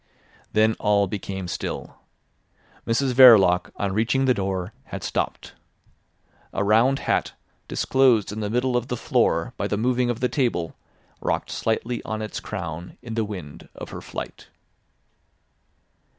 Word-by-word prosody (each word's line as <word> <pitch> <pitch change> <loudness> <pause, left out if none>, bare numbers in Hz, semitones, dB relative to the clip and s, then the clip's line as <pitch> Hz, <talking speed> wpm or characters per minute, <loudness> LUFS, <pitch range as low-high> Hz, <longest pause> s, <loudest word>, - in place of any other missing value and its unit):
Then 110 +1 +4
all 105 -1 +3
became 95 -1 -5
still. 85 - -5 0.9
Mrs 125 +3 +1
Verloc 105 -9 +7
on 100 -2 -2
reaching 120 +6 +1
the 130 - +4
door 95 -1 -3
had - - -7
stopped. - - -3 1.0
A 95 - 0
round 115 +6 +4
hat - - -1 0.3
disclosed 125 -7 +3
in 105 - -5
the 105 -1 -2
middle 125 +3 0
of 120 0 0
the 125 - -3
floor - - +1
by - - -1
the 105 - -1
moving 125 +2 +1
of 120 - -2
the 125 - +2
table 120 - -1 0.5
rocked - - -1
slightly 115 +2 -1
on 110 0 -4
its 110 - -5
crown 85 +2 -6
in 115 -2 -6
the 115 0 0
wind 90 -9 -8
of - - -8
her - - -7
flight. - - -7
110 Hz, 145 wpm, -24 LUFS, 100-125 Hz, 1.0 s, Verloc